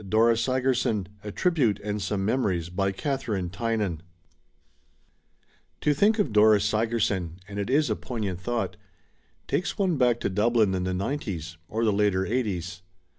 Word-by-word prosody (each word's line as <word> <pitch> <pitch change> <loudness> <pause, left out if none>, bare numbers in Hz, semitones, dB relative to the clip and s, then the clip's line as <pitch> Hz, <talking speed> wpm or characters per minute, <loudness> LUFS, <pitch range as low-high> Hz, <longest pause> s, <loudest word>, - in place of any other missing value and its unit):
DORA 115 +3 +4
SIGERSON 125 -5 0
A 105 - -5
TRIBUTE 145 - +1
AND 105 0 -2
SOME 95 0 -1
MEMORIES 100 -8 0
By 95 +1 0
Kathabine 105 - -2
Tynan 105 -5 -1 1.8
TO 150 - +2
think 205 +9 +3
of 160 - 0
Dora 105 0 +6
Sigerson 105 -5 0
— 90 - -25
and 100 0 -6
it 100 - -2
is 145 +3 +3
a - - +1
poignant 105 -8 -4
thought 120 +3 -2 0.4
— - - -40
^takes 180 - -1
one 185 -6 +1
back 120 -2 +3
to - - 0
Dublin 110 0 +2
in 90 -1 -1
the 95 - -1
'nineties, 90 - -3
or 115 +2 -1
the 105 - +3
later 100 -2 +2
'eighties. 95 -6 -2
105 Hz, 160 wpm, -26 LUFS, 95-120 Hz, 1.8 s, Dora